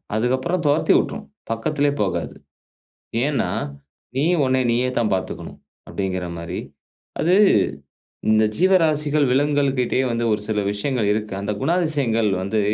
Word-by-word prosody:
அதுக்கப்புறம் 130 +10 0
தொரத்தி 145 - +3
விட்ரும். - - -2 0.3
பக்கத்திலயே 145 +5 0
போகாது. 90 -4 -2 0.9
ஏன்னா, 135 -11 0 0.7
நீ 140 - +2 0.2
உன்ன 130 0 +2
நீயேதான் 120 -2 +1
பார்த்துக்கணும் 95 - -5 0.3
அப்படிங்கிற 95 -2 -3
மாதிரி. 85 0 -5 0.6
அது 175 +3 +3 1.0
இந்த 110 0 +4
ஜீவராசிகள், 155 -5 +3
விலங்குகள் 140 0 +2
கிட்டயே 125 +1 +1
வந்து 115 0 -1
ஒரு 105 - 0
சில 105 -1 0
விஷயங்கள் 110 +1 -1
இருக்கு. 105 -1 -3
அந்த 100 +1 -2
குணாதிசயங்கள் 145 -11 +1
வந்து 105 +3 0
125 Hz, 120 wpm, -22 LUFS, 110-145 Hz, 1.0 s, இந்த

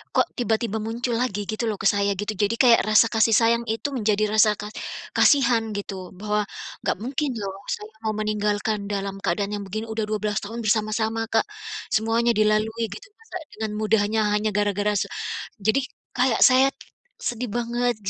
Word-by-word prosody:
kok - - +4
tiba-tiba 225 -2 0
muncul 235 +1 -2
lagi 245 -5 -1
gitu 215 +2 -3
loh - - -3
ke - - +4
saya 200 0 +1
gitu. 205 +1 -1
Jadi 205 +3 +1
kayak 240 -2 +7
rasa 215 +2 +6
kasih 225 0 +4
sayang 235 +1 +3
itu 225 - -3
menjadi 215 -2 +1
rasa 215 0 +6
ka 210 - -5 0.5
kasihan 245 -6 +5
gitu 200 -1 -5 0.2
bahwa, 210 0 0 0.4
enggak - - 0
mungkin 275 +4 -1
loh 195 -1 -3 0.2
saya 210 +1 -11
mau 220 - 0
meninggalkan 210 0 -1
dalam 195 -1 -2
keadaan 200 +3 0
yang 205 - -5
begini 215 +4 -4
udah 220 0 -1
12 210 -1 -1
tahun 225 +3 -6
bersama-sama, 220 +1 0
Kak. 225 - +3 0.5
Semuanya 225 +2 +2
dilalui 215 +2 +2
gitu 400 -1 -9
masa 450 -4 -8 0.2
dengan 220 0 -3
mudahnya 215 0 +2
hanya 210 +1 +1
gara-gara 205 0 +1
se - - -1 0.6
jadi 220 +6 +3 0.4
kayak 250 -2 +2
saya 260 +1 +6 0.5
sedih 240 0 -3
banget, 240 +1 0
220 Hz, 165 wpm, -24 LUFS, 210-235 Hz, 0.6 s, kayak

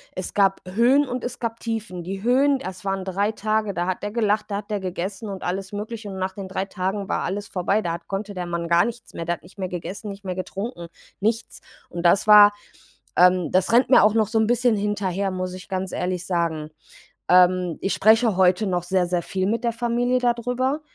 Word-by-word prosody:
es 185 - -4
gab 195 -1 +3
Höhen 245 +9 +3
und 250 0 -4
es 245 - -5
gab 230 -1 -3
Tiefen. 220 -6 -4
Die 190 +3 -6
Höhen, 270 +3 +3
das 185 -6 -7
waren 195 -1 -1
3 200 +3 0
Tage, 215 -1 -1
da 175 -1 -2
hat 185 +1 -3
er 205 - -3
gelacht, 210 -2 +1
da 200 - -1
hat 205 +1 -8
er 205 - 0
gegessen 190 +3 -4
und 195 -1 -6
alles 190 +1 -3
Mögliche, 210 +1 -6
und 190 - -7
nach 190 0 -2
den 195 -1 -7
3 190 +1 -2
Tagen 195 +1 -3
war - - -1
alles 200 +2 -3
vorbei. 195 +3 0
Da 170 -4 -2
hat 170 - -8
konnte 200 +1 -4
der 180 -2 -4
Mann 170 -1 -3
gar 170 +1 +4
nichts 235 0 -7
mehr. 170 - -5
Der 175 +1 0
hat - - -22
nicht 175 +4 -18
mehr 185 -2 -3
gegessen, 185 +4 -6
nicht 200 0 -9
mehr 185 -1 -3
getrunken, 185 0 -5 0.3
nichts. 225 +2 -2 0.3
Und 170 0 -5
das 195 +5 +4
war, 210 -1 +9 0.7
ähm 180 -1 +5
das 185 0 +2
rennt 245 +3 +5
mir 260 - +7
auch 210 - +4
noch 220 -2 +2
so 220 +2 0
'n 220 - +2
bisschen 240 0 +2
hinterher, 200 -2 -1
muss 185 0 -4
ich 185 0 -10
ganz 190 -1 -3
ehrlich 180 0 -2
sagen. 165 -4 -1 0.6
Ähm, 180 -1 +4
ich 195 - 0
spreche 220 -1 +4
heute 185 +2 +3
noch 180 -2 0
sehr, 185 0 +1
sehr 175 0 -1
viel 185 +2 -2
mit 230 +4 -1
der 235 - +1
Familie 240 +2 0
da 245 -1 +3
drüber 250 +5 -1
195 Hz, 230 wpm, -23 LUFS, 185-220 Hz, 0.7 s, war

